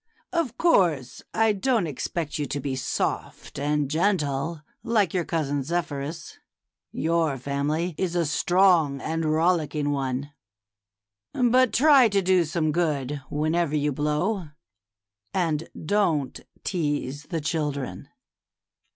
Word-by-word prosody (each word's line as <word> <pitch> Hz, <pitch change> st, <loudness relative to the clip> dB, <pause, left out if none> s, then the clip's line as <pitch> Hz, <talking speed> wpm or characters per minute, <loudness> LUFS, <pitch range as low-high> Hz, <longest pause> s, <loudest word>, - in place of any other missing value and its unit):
Of 315 Hz, -9 st, -1 dB
course 170 Hz, -, +2 dB
I 225 Hz, -1 st, +3 dB
don't 225 Hz, 0 st, +1 dB
expect 150 Hz, +2 st, -3 dB
you 145 Hz, -, -1 dB
to 145 Hz, -, -3 dB
be 135 Hz, -1 st, -3 dB
soft 130 Hz, -, -3 dB
and 145 Hz, 0 st, 0 dB
gentle, 155 Hz, -2 st, 0 dB, 0.2 s
like 210 Hz, -7 st, +1 dB
your 180 Hz, -3 st, 0 dB
cousin 145 Hz, -3 st, -1 dB
Zephyrus. 155 Hz, 0 st, -4 dB, 0.5 s
Your 160 Hz, -3 st, 0 dB
family 145 Hz, +6 st, -1 dB
is 180 Hz, -2 st, -1 dB
a 170 Hz, -1 st, +2 dB
strong 165 Hz, -2 st, +3 dB
and 160 Hz, +3 st, -2 dB
rollicking 155 Hz, -2 st, +1 dB
one; 135 Hz, 0 st, -2 dB, 1.0 s
but 250 Hz, 0 st, +3 dB
try 275 Hz, -3 st, +6 dB
to 200 Hz, -1 st, +2 dB
do 185 Hz, -2 st, +3 dB
some 155 Hz, -1 st, 0 dB
good 145 Hz, -4 st, -1 dB
whenever 155 Hz, +1 st, 0 dB
you 150 Hz, 0 st, +1 dB
blow, 150 Hz, +7 st, -1 dB, 0.9 s
and 165 Hz, -4 st, 0 dB, 0.2 s
don't 160 Hz, -7 st, +1 dB, 0.2 s
tease 145 Hz, -5 st, -2 dB
the 165 Hz, -3 st, -3 dB
children." 150 Hz, -3 st, -3 dB
160 Hz, 115 wpm, -25 LUFS, 145-180 Hz, 1.0 s, try